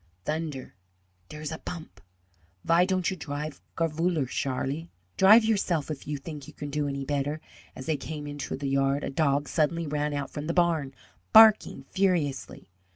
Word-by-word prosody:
"Thunder, 155 -4 -4 0.6
dere's 150 0 -6
a 160 - -5
bump! 155 - -8 0.6
Vy 170 +2 +4
don'd 185 -2 0
you - - -3
drive 150 -2 -5 0.2
garefuller, 165 -1 +1
Sharlie?" 140 +6 -2 0.3
"Drive 215 +4 +7
yourself, 180 -9 0
if 145 - -7
you 150 0 -2
think 145 0 -8
you - - -11
can 145 -1 -6
do 150 0 -1
any 140 -1 -3
better!" 145 +2 -1 0.4
As 130 - -8
they 155 0 0
came 150 -1 -6
into 145 -1 -5
the 140 - -6
yard 135 +1 +1
a - - -3
dog 145 0 +1
suddenly 165 +1 0
ran 150 0 -1
out 140 -1 -4
from 150 +1 -5
the 170 - -1
barn, 165 -6 +1 0.4
barking 215 -10 +7
furiously. 175 -8 0
150 Hz, 165 wpm, -27 LUFS, 140-170 Hz, 0.6 s, Drive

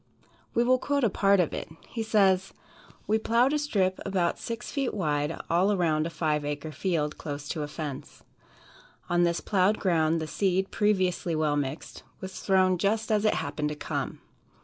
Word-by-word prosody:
We 235 - +4
will 255 +1 +3
quote 285 0 0
a 225 - +3
part 200 0 +3
of 175 - +1
it. - - -5 0.2
He 230 - -5
says: 195 -4 +2 0.5
"We 220 +1 +2
plowed 235 +5 +2
a 300 - +2
strip 195 -10 0
about 185 -3 0
six 230 0 -5
feet 275 -5 -1
wide 150 -4 -1
all 180 +5 +3
around 165 -5 +1
a - - -4
five 155 -2 -1
acre 145 +1 -4
field, 155 -1 -1
close 145 -1 -5
to 165 - -3
the 150 - -2
fence. 145 -2 -7 0.9
On 175 0 +4
this 170 0 0
plowed 200 +1 +2
ground, 165 -3 +2
the 160 - -3
seed, 190 +3 0
previously 185 -5 +1
well 155 -1 +1
mixed, 145 +1 -4 0.2
was 190 0 -7
thrown 185 -2 +3
just 215 +3 0
as 215 0 +2
it 215 - +3
happened 150 0 -2
to 150 - -4
come. - - -4
185 Hz, 180 wpm, -27 LUFS, 155-210 Hz, 0.9 s, We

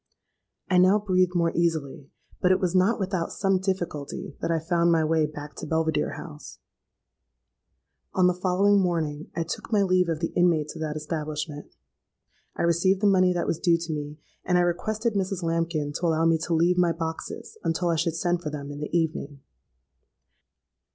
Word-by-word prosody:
"I 180 -1 +3
now 185 +3 +5
breathed 185 -3 +1
more 170 -1 +2
easily; 155 -5 -1 0.3
but 180 - +4
it 185 - +3
was 180 -3 0
not 190 +5 +3
without 185 -3 -2
some 195 -2 +1
difficulty 175 -7 -4
that - - -1
I 165 - +2
found 170 +1 +1
my 165 -1 +3
way 155 -1 +2
back 150 0 -9
to - - -6
Belvidere 160 0 0
House. 150 -2 -10 1.6
"On 185 - +4
the 180 - +4
following 190 +3 +3
morning 160 -4 -2
I 165 - 0
took 165 - -6
my 205 -2 +4
leave 185 -2 +2
of 160 -2 -1
the 165 - -3
inmates 165 -4 +2
of 160 - -8
that 155 -1 -3
establishment. 150 -1 -5 0.8
I - - -2
received 170 +3 +2
the - - +2
money 185 -2 +4
that 175 - -1
was 165 - -1
due 170 -1 +3
to 165 -1 -4
me; 150 0 -5 0.3
and 180 0 +2
I - - +4
requested 215 +6 -1
Mrs. 190 -2 -2
Lambkin 165 -3 -1
to 170 - -1
allow 165 0 +2
me 165 -1 +3
to 170 - 0
leave 175 +2 +3
my 175 -2 +3
boxes 165 -1 -6
until 165 +1 0
I 165 - +2
should 165 0 0
send 175 0 0
for 155 - -4
them 145 -1 -6
in 145 - -7
the 150 - -4
evening. 150 -4 -3
170 Hz, 185 wpm, -26 LUFS, 155-185 Hz, 1.6 s, now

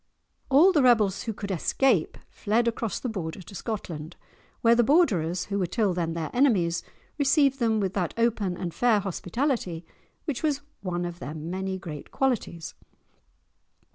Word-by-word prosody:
All 300 +8 +7
the 310 -6 +3
rebels 220 -6 +4
who 225 - -1
could 200 -1 -5
escape 260 - +1
fled 230 +3 0
across 230 -3 -2
the - - -4
Border 185 -5 -5
to 185 - -13
Scotland, 175 -6 -5 0.5
where 230 0 +5
the 240 0 +4
Borderers, 185 - +2
who 200 0 -2
were 185 - 0
till 210 -1 +1
then 170 -2 -1
their 165 -2 -4
enemies, 195 -11 +2 0.4
received 275 -1 +3
them 225 -3 +2
with 195 -2 -1
that 180 -4 -2
open 215 -6 +1
and 175 -3 -4
fair 235 -4 +3
hospitality 190 - -2 0.4
which 290 -7 -3
was 295 -3 0 0.2
one 175 -2 -2
of 175 0 -6
their 150 -1 -6
many 190 +5 -3
great 160 -6 -8
qualities. 235 -11 -2
200 Hz, 160 wpm, -26 LUFS, 175-245 Hz, 0.5 s, All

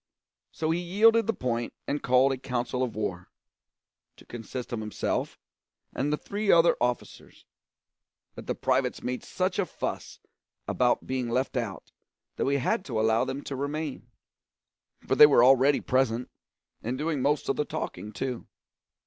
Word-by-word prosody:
So 160 0 -1
he 170 - 0
yielded 215 +5 +4
the - - +3
point 120 - -2
and 145 +1 -1
called 130 +2 +4
a 135 - -1
council 125 0 -2
of 125 -3 -2
war 90 -5 -4 0.9
to - - -16
consist 120 +1 -7
of 115 - -2
himself 110 -1 -2 0.6
and 145 +3 -1
the 150 - +1
three 205 +4 -1
other 170 0 +5
officers; 120 -1 -3 0.9
but - - -10
the - - -1
privates - - 0
made 125 0 -3
such 185 +1 -2
a 200 - +2
fuss - - -5 0.5
about 125 -1 +1
being 130 -2 -2
left 130 +4 -1
out, 115 -6 -4 0.5
that - - 0
we 140 - +2
had 185 - 0
to 115 -5 -2
allow 110 +1 +2
them 135 +2 -5
to 140 - -5
remain, 145 -2 -4 1.0
for - - +1
they 150 +2 +9
were 140 -5 +5
already 135 +2 +5
present, 125 -2 0 0.5
and 120 +3 -3
doing 155 0 -1
the 135 +2 +2
most 150 0 -1
of 135 - +1
the - - 0
talking 145 -8 -5
too. 125 +1 -4
130 Hz, 165 wpm, -27 LUFS, 120-150 Hz, 1.0 s, they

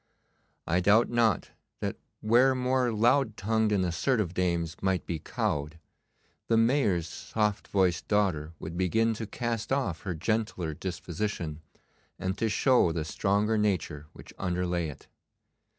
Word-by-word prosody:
I 90 - +2
doubt 105 +7 +4
not 115 -6 +2 0.3
that - - -2 0.3
where 125 +5 +4
more 125 -1 +1
loud 115 +1 +2
tongued 110 +1 +1
and 95 -3 +2
assertive 95 +1 0
dames 85 -3 0
might 95 -1 0
be 85 -2 -3
cowed, 75 +1 -2 0.7
the 115 - +3
Mayor's 115 - +2
soft 105 +3 -2
voiced 95 -3 +1
daughter 90 -7 +1
would 80 +1 -7
begin 110 +6 +2
to 110 0 -5
cast 115 0 -3
off 105 - 0
her 90 -3 -4
gentler 105 -2 -1
disposition, 85 -1 -4 0.6
and 95 0 -2
to 115 - +1
show 125 -5 +3
the 80 -2 -2
stronger 105 +7 +1
nature 85 -8 -1
which - - -13
underlay 90 -2 -1
it. 75 - -10
100 Hz, 135 wpm, -29 LUFS, 85-115 Hz, 0.7 s, doubt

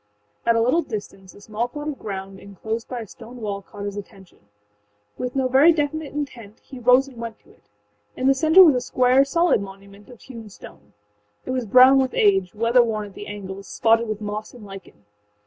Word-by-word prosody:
â - - +2
At 230 - +4
a 230 - +2
little 255 +9 +2
distance 200 - -8
a - - -16
small 215 +3 -3
plot 295 +4 -6
of 290 - -7
ground 195 -1 -7
enclosed 220 +4 -6
by 245 -2 -5
a - - -7
stone 235 +4 -13
wall 200 -3 -4
caught 205 -1 -10
his 200 -1 -5
attention. 195 -2 -12 0.8
With 250 +1 -4
no 265 -1 +1
very 270 +6 +5
definite 310 -1 -2
intent 240 -8 -7
he 260 - -11
rose 250 +3 +4
and 260 -3 -14
went 230 -1 -7
to - - -23
it. - - -28 0.5
In 255 - -3
the 270 - +5
center 320 +7 +6
was 320 -5 +6
a 250 - -1
square, 255 +2 +3
solid 335 - +1
monument 200 +2 -12
of 245 -3 -15
hewn 230 -5 -11
stone. - - -15 0.5
It - - -4
was 255 -3 -2
brown 255 +5 +7
with 260 -1 -1
age, 195 -2 +2
weather 230 +3 +3
worn 215 -3 -2
at - - -19
the 205 - -9
angles, 200 -1 -8
spotted 230 +1 +2
with 215 0 -5
moss 210 +2 -6
and 230 -4 -12
lichen. 195 - -13
230 Hz, 215 wpm, -22 LUFS, 205-260 Hz, 0.8 s, brown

